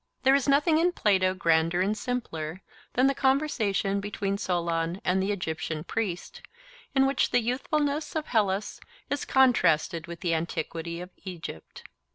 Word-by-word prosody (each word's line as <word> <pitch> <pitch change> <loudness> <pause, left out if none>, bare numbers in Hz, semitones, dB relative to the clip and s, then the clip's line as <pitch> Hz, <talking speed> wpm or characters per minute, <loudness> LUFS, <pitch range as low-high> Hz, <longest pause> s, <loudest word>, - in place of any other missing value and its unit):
There 265 0 +6
is 280 0 +2
nothing 300 +3 +4
in 350 +2 +2
Plato 190 - +2
grander 165 -1 +2
and 200 +3 +1
simpler 185 -9 -4 0.3
than 255 - +3
the 275 - +4
conversation 230 -9 +1
between 200 0 -3
Solon 170 -1 -1
and 185 +1 +2
the 195 +2 0
Egyptian 160 -4 -3
priest, 220 - -4 0.5
in 270 0 +5
which 270 +1 +2
the 245 - +3
youthfulness 285 +6 -1
of 310 -1 -1
Hellas 205 -4 0 0.3
is 285 - -1
contrasted 170 - +3
with 170 -1 -8
the 175 -3 0
antiquity 165 +1 -3
of 180 +1 -9
Egypt. 170 - -8
195 Hz, 150 wpm, -27 LUFS, 170-265 Hz, 0.5 s, There